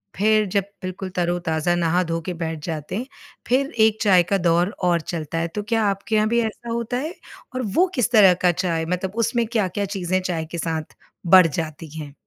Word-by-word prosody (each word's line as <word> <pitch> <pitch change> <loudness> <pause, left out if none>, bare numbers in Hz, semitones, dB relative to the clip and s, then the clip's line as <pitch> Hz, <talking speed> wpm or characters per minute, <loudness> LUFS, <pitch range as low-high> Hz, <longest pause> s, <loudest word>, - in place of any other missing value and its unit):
फिर 215 +2 +3
जब 200 -2 +2 0.2
बिल्कुल 185 +1 -5
तरो-ताज़ा 175 -1 0
नहा 175 +1 +1
धो 165 0 -2
के 180 +2 -4
बैठ 165 -2 -4
जाते 160 0 -4
हैं, 245 +4 -3 0.4
फिर 270 +3 +1
एक 220 0 +4
चाय 185 -4 +5
का 195 - +4
दौर 175 +1 +2
और 175 -2 +2
चलता 160 -1 -5
है, 165 0 0
तो 205 +5 -5
क्या 225 +1 0
आपके 200 +3 -2
यहाँ 215 0 +3
भी 235 0 +2
ऐसा 230 +1 -5
होता 235 +1 -2
है? 310 +7 -3 0.4
और 255 - -1
वो 370 +2 +5
किस 245 -1 +1
तरह 200 -5 +7
का 180 - +5
चाय 170 -2 -1
मतलब 180 +3 -3
उसमें 235 -2 0
क्या 220 -5 0
क्या 200 +3 -2
चीज़ें 185 +1 0
चाय 170 -3 -2
के 170 - -4
साथ 160 -2 -4 0.3
बढ़ 180 0 +7
जाती 160 0 -5
हैं? 145 -2 -8
185 Hz, 210 wpm, -22 LUFS, 165-215 Hz, 0.4 s, तरह